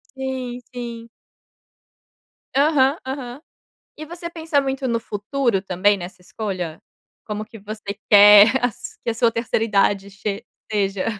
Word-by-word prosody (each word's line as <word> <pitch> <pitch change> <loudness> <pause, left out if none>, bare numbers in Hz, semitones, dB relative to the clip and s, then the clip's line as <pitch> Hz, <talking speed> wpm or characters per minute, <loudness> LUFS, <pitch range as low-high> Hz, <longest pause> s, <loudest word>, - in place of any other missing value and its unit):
Sim, 260 -2 -4
sim. 235 -1 -7 1.5
Aham, 280 0 +3
aham, 260 0 -6 0.6
e 310 - -7
você 340 +1 -7
pensa 320 -3 0
muito 270 -1 -2
no 230 -1 0
futuro 225 +1 -1
também 195 +2 +2
nessa 180 0 -9
escolha? 180 -5 -5 0.5
Como 210 0 -4
que 225 +1 -13
você 210 0 -7
quer 205 +1 +9
as 245 -4 -3
que - - -1
a - - 0
sua 230 +1 +2
terceira 225 -1 -1
idade 200 -1 +1
che 205 +3 -5 0.3
seja? 195 -2 0
225 Hz, 135 wpm, -21 LUFS, 200-265 Hz, 1.5 s, quer